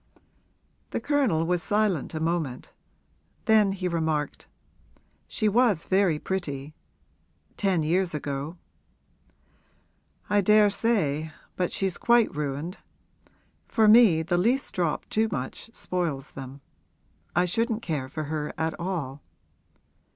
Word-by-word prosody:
The - - -2
Colonel 255 - +1
was 175 0 0
silent 205 -6 0
a - - -2
moment; 160 -6 -2 0.7
then 215 -3 +5
he 185 -2 -3
remarked, 160 -4 -2 0.8
'She 215 - -1
was 210 -5 +3
very 190 -4 +2
pretty 150 -5 -4 0.8
ten 190 -5 +1
years 175 +1 +1
ago.' 145 +3 -4 1.7
'I 205 0 +3
daresay, 205 -7 +3 0.3
but 180 -1 -1
she's 190 -3 -1
quite 235 -6 +3
ruined. 150 +5 -4 0.9
For 220 -2 +3
me 210 -8 +7
the 175 +2 0
least 250 +8 +1
drop 170 -4 -1
too 220 +1 +1
much 130 - -5
spoils 165 -10 -3
them; 135 +1 -9 0.7
I 175 +2 +4
shouldn't 230 +5 -1
care 140 -6 -3
for 155 - -4
her 150 0 -4
at 160 0 -1
all.' 160 -7 -4
175 Hz, 115 wpm, -26 LUFS, 150-205 Hz, 1.7 s, me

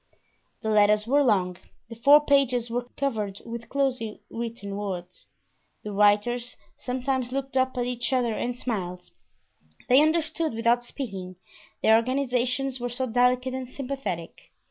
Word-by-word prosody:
The 220 - 0
letters 210 0 +4
were 280 +5 +3
long—the 205 0 -1
four 290 +5 +6
pages 255 -5 +2
were 245 +1 -3
covered 215 -8 -2
with 235 0 -7
closely 255 -6 -1
written 230 -4 -5
words. 185 -3 -6 0.6
The 210 - -5
writers 210 +5 +2 0.2
sometimes 255 0 -2
looked 270 0 -4
up 260 0 +1
at 245 - 0
each 245 0 -2
other 245 -3 +1
and 245 +2 -3
smiled; 180 -7 -4 0.8
they 260 +3 +7
understood 315 -2 +1
without 235 +1 +2
speaking, 195 -8 -6 0.5
their 220 - +6
organizations 255 +1 0
were 245 0 -3
so 245 +2 -2
delicate 250 +2 +2
and 260 -1 -5
sympathetic. 255 -12 -5
245 Hz, 135 wpm, -26 LUFS, 215-260 Hz, 0.8 s, they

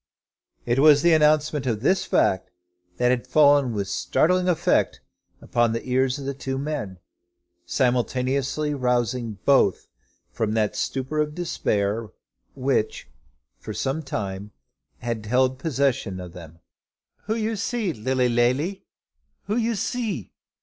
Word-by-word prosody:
It 120 +2 +1
was 145 0 +6
the 170 -1 +5
announcement 150 -2 +3
of 110 -3 -1
this 185 +8 +2
fact 95 0 +1 0.5
that 125 0 +3
had 125 -1 -1
fallen 145 -4 +5
with 100 -3 -2
such 100 - -2
startling 180 +6 +3
effect 170 - +1 0.4
upon 120 -1 +1
the 115 - -4
ears 130 0 +1
of 140 - -7
the 140 - -2
two 135 0 -4
men, 135 -10 -4 0.7
simultaneously 130 +5 0
rousing 120 -4 -1
both 135 -9 +3 0.5
from 110 -1 -1
that 110 -2 +1 0.2
torpor 135 +3 -3
of 150 0 -1
despair 110 - -1 0.5
which 130 -4 -1 0.5
for - - -7
some 135 +4 -1
time 100 -7 -5 0.5
had 115 -2 -4
held 130 +2 +2
possession 130 - -1
of 90 -2 -9
them. 85 -2 -12 0.7
"Who 220 - -1
you 225 0 -1
see, 215 -3 -2
Lilly 130 +2 0
Lally? 125 +10 +1 0.6
Who 210 - -2
you 230 -1 0
see?" 210 - -3
130 Hz, 135 wpm, -24 LUFS, 115-150 Hz, 0.7 s, was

